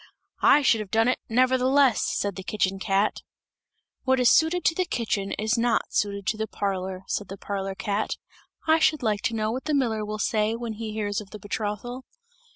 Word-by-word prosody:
"I 295 - +6
should 230 -4 +4
have 210 -2 -5
done 225 +3 +3
it, 255 - 0
nevertheless!" 255 +1 +3
said 200 -2 -1
the 190 - -6
kitchen 195 -1 -1
cat. 195 +2 +1 0.8
"What 260 0 +2
is 250 -1 +5
suited 320 +3 +3
to - - +4
the 370 - 0
kitchen 215 - -2
is 220 +3 0
not 235 0 +1
suited 200 -1 -1
to 215 - 0
the 220 0 -2
parlour," 190 -2 -3
said 205 - -3
the 195 - -8
parlour 195 -1 -4
cat. 205 +2 -2 0.5
"I 320 0 +4
should 310 -3 +2
like 210 -3 +1
to 230 -2 -1
know 215 0 0
what 255 +3 -4
the 305 -1 +1
miller 225 -6 0
will 210 0 -4
say, 215 +1 +1
when 230 -1 -4
he 220 0 -5
hears 210 -1 -2
of 200 - -12
the 215 - -8
betrothal!" 210 +5 -4
215 Hz, 200 wpm, -26 LUFS, 205-250 Hz, 0.8 s, I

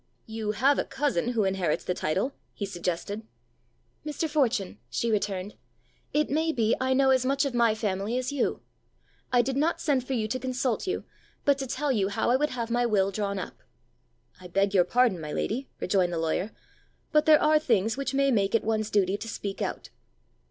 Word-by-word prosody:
"You 220 -1 -3
have 270 +7 +3
a - - +2
cousin 255 -5 -1
who 225 -3 +2
inherits 190 -5 0
the 180 - -1
title!" 190 - -1 0.2
he 205 - -3
suggested. 185 +2 -3 0.8
"Mr. 305 +2 -2
Fortune," 235 -10 0
she 230 - -1
returned, 200 -2 -1 0.6
"it 300 +1 +2
may 320 +2 +2
be 230 -6 +1
I 260 0 +2
know 270 0 +4
as 260 -1 +3
much 275 +2 +1
of 275 - -2
my 235 -2 +3
family 210 +1 -1
as 255 0 -2
you. 285 -3 -1 0.7
I 245 -1 +4
did 265 +2 -2
not 310 +5 +1
send 280 -5 +1
for 265 - -4
you 220 -4 0
to 255 - -1
consult 255 - -1
you, 370 - -1 0.4
but 280 -1 +3
to 270 - -3
tell 280 +3 -1
you 200 -6 +1
how 200 +4 0
I - - +5
would 300 +3 +1
have 235 -2 -4
my 240 +1 +2
will 200 -4 +2
drawn 200 0 -2
up!" 185 - -7 0.8
"I 185 - -10
beg 195 +3 +1
your 180 -3 +5
pardon, 230 -4 +2
my 150 -1 -5
lady," 255 +5 -2
rejoined 185 -2 +1
the - - -1
lawyer, 165 +5 -1 0.6
"but 305 -1 +3
there 310 -1 +8
are 305 0 +4
things 225 -6 +1
which 275 0 -3
may 275 0 +3
make 200 -3 +2
it 230 - +2
one's 215 -1 0
duty 200 -1 +2
to 225 - -7
speak 200 -3 -5
out." - - -4
230 Hz, 200 wpm, -27 LUFS, 200-270 Hz, 0.8 s, there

